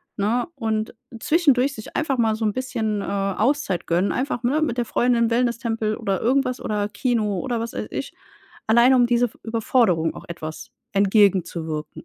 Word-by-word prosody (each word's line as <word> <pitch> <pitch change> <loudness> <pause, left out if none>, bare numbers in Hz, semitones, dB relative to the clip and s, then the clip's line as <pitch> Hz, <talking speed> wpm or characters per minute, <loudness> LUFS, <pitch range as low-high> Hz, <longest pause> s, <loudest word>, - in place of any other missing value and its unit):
ne? 225 +7 0
Und 220 -3 -2 0.2
zwischendurch 280 -3 +2
sich 215 - -10
einfach 275 -4 0
mal 225 -2 +2
so 220 0 -2
'n 210 - +1
bisschen, 220 -5 -2
äh, - - -4
Auszeit 200 +2 0
gönnen. 175 +4 +1
Einfach, 255 -1 -2
ne, 285 +6 +1
mit 260 -6 -1
der 240 - 0
Freundin 235 -1 +2
Wellnesstempel 230 -2 0
oder 195 -5 -2
irgendwas 255 0 +1
oder 205 -1 -1
Kino 215 -5 -1
oder 245 -3 -2
was 230 +1 -4
weiß - - -4
ich, - - -5 0.5
allein 235 +4 +5
um 245 -2 +5
diese 240 0 +2
f 230 - -15
Überforderung 225 -7 +1
auch - - -10
etwas 160 -2 -7 0.2
entgegenzuwirken. 190 -6 +1
225 Hz, 170 wpm, -23 LUFS, 205-250 Hz, 0.5 s, allein